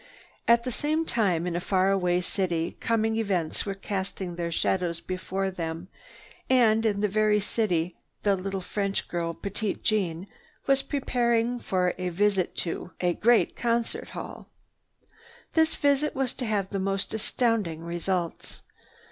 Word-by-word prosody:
At 235 0 +5
the 255 - -2
same 310 +6 0
time, 190 - +1
in 175 -1 -2
a - - +1
far 190 +1 +2
away 180 -2 +2
city 175 -3 -1
coming 225 -1 +1
events 190 -6 0
were 195 - -2
casting 190 -2 -3
their 170 -1 -2
shadows 170 0 0
before 190 +1 -3
them, 165 0 -5 0.6
and 225 -4 +5
in 205 -2 0
that 210 - +3
very 210 +1 +3
city 180 -5 0 0.3
the 200 -1 +4
little 195 0 -3
French 200 +1 -2
girl 170 -1 -2
Petite 205 +1 -3
Jeanne 185 -5 +1 0.4
was 275 0 +4
preparing 240 -4 +1
for 180 -5 +1
a 180 0 -1
visit 195 +1 +1
to 170 - -4
a 175 -1 +2
great 235 +6 +3
concert 235 -1 -1
hall. - - -8 1.0
This 320 0 +3
visit 285 +1 +2
was 265 -2 0
to 250 - -4
have 200 -3 0
the 200 - -1
most 195 +1 -1
astounding 220 -7 0
results. 170 0 -3
195 Hz, 150 wpm, -27 LUFS, 180-225 Hz, 1.0 s, At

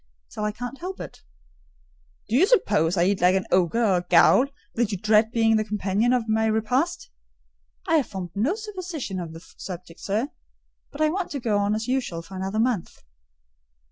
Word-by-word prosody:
"Till 210 - -5
I 210 - 0
can't 245 +5 -7
help 370 +2 -6
it." - - -9 1.1
"Do 220 - -1
you 345 +9 +5
suppose 205 - +2
I 170 - +4
eat 195 0 +1
like 180 +1 +5
an 190 - 0
ogre 185 +6 +2
or 190 -4 +3
a - - 0
ghoul, 180 +9 +5 0.3
that 230 -2 0
you 200 - -2
dread 215 +3 +3
being 225 -1 +3
the 215 - +1
companion 210 +2 0
of 245 -3 +1
my 220 0 +2
repast?" 220 - 0 0.8
"I 325 - +4
have 285 - 0
formed 185 -4 -6
no 240 - 0
supposition 360 - -5
on 170 -2 -6
the 165 - -9 0.2
subject, 175 -2 -8
sir; 220 +8 -1 0.6
but 285 - -7
I 310 - +4
want 365 +2 -2
to 280 - -2
go 220 -4 0
on 205 +1 +1
as 220 +2 -3
usual 250 -10 -2
for 190 +3 -11
another 190 +3 -3
month." 225 -6 -1
220 Hz, 195 wpm, -24 LUFS, 190-255 Hz, 1.1 s, you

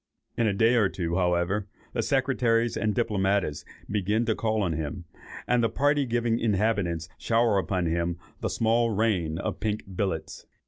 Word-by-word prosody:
In 115 - +1
a 105 - +2
day 115 +4 +3
or 110 -6 +3
two, 85 -2 -2
however, 90 +3 +1 0.3
the 115 - 0
secretaries 120 -3 +1
and 105 -2 0
diplomatists 100 -8 0 0.2
begin 105 +3 0
to 110 - +2
call 110 -1 0
on 85 -4 0
him, 80 +3 -4 0.4
and 120 -1 +2
the 115 - +3
party 145 -1 +1
giving 120 -1 +1
inhabitants 100 -6 0
shower 115 -3 +2
upon 95 -2 -1
him 85 +1 -1 0.2
the - - -2
"small 115 +1 +2
rain" 95 -7 0
of - - -3
pink 110 -1 -2
billets. 95 -5 -3
105 Hz, 165 wpm, -27 LUFS, 90-115 Hz, 0.4 s, day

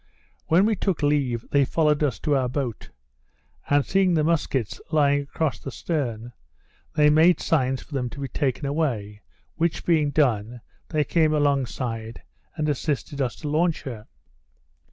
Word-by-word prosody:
When 180 +5 +4
we 220 0 +2
took 190 -5 -1
leave 135 -6 +1
they 140 -1 +4
followed 150 +2 +1
us 140 -6 +1
to 150 -2 +1
our 130 -2 +1
boat; 125 -4 -4 0.8
and, 145 -1 +3
seeing 190 -2 +2
the 155 - +2
musquets 150 -8 -1
lying 145 -2 +3
across 140 0 -2
the - - -7
stern, 120 -6 -3 0.6
they 150 -1 +5
made 165 +4 +5
signs 130 -4 0
for - - -15
them 125 -3 -1
to 140 - -10
be 140 - -3
taken 140 0 -2
away, 120 -9 -2 0.4
which 170 0 -1
being 155 -4 +3
done, 120 -5 0 0.3
they 155 -1 +1
came 155 +1 +2
alongside, 125 -6 -1 0.3
and 155 -2 -1
assisted 145 0 -2
us 125 -3 -1
to 150 - -7
launch 160 +2 +1
her. 115 -5 -7
145 Hz, 155 wpm, -24 LUFS, 125-155 Hz, 0.8 s, they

